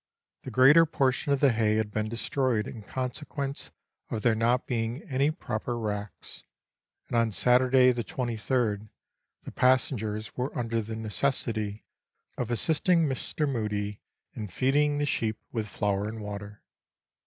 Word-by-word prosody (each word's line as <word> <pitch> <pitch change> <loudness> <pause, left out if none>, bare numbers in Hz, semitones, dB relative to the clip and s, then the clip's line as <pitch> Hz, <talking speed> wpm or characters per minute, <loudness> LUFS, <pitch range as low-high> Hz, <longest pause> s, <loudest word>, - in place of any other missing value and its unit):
The - - -7
greater 150 +6 +7
portion 135 -1 +1
of 140 - +2
the 140 -3 +6
hay 110 -2 +2
had 110 -1 0
been 110 +1 -1
destroyed 120 -1 0
in 115 - -8
consequence 135 +4 -4 0.4
of 110 - -3
there 120 - +4
not 120 +3 +2
being 120 +3 -2
any 140 -1 +1
proper 120 -6 -3
racks, 105 -2 -4 0.6
and - - -4
on 115 -1 +3
Saturday 125 +3 +4
the 120 -1 -2
23rd 120 -5 -1 0.5
the - - -8
passengers 110 -4 +1
were 125 +3 -3
under 115 -1 0
the 110 +1 -6
necessity 110 -1 -1 0.5
of 125 - -3
assisting 160 +7 +2
Mr. 150 +3 -2
Mudie 105 -5 -2 0.3
in 105 - -5
feeding 145 +9 +2
the 145 - +1
sheep 110 -6 0
with 110 -3 -2
flour 100 0 -1
and 110 0 -7
water. 105 0 -7
120 Hz, 145 wpm, -28 LUFS, 110-130 Hz, 0.6 s, greater